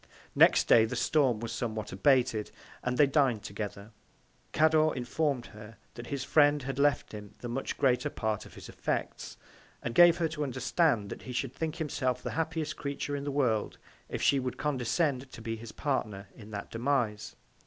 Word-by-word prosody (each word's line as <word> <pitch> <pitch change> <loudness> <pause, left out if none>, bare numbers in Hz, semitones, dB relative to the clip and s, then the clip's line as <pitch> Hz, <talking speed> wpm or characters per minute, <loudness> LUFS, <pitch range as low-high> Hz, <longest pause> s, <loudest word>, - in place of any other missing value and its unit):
Next - - +6
Day 110 -1 +6
the 115 - -4
Storm 130 -3 +2
was 115 -1 -4
somewhat 110 -2 -4
abated, 125 -6 +2 0.3
and 125 0 -1
they 145 - +7
din'd 135 -6 +2
together; 105 0 -6 0.6
Cador 155 0 +3
inform'd 130 0 -1
her, 110 +1 -12 0.2
that 120 0 -9
his 140 -2 -3
Friend 145 -1 +4
had 135 0 -4
left 145 0 +2
him 105 -1 -9
the 120 - -7
much 120 +3 -3
greater 135 +2 +2
Part 110 -6 -3
of - - -16
his - - -10
Effects, - - -4 0.5
and 120 - -3
gave 175 +2 +7
her 170 -2 +1
to 155 -1 -6
understand, 130 - 0
that - - -7
he 130 - -8
should 125 +1 -2
think 160 +2 -3
himself 130 -6 -2
the - - -3
happiest 160 -1 -2
Creature 145 0 -3
in 140 0 -4
the - - -2
World, 125 -7 0 0.3
if - - -4
she 140 - +4
would 130 -1 -4
condescend 135 -1 -1
to - - -10
be 115 0 -4
his 115 0 -9
Partner 105 -9 -3
in 110 -2 -13
that 105 -2 -7
Demise. 120 -3 -1
130 Hz, 185 wpm, -30 LUFS, 115-145 Hz, 0.6 s, they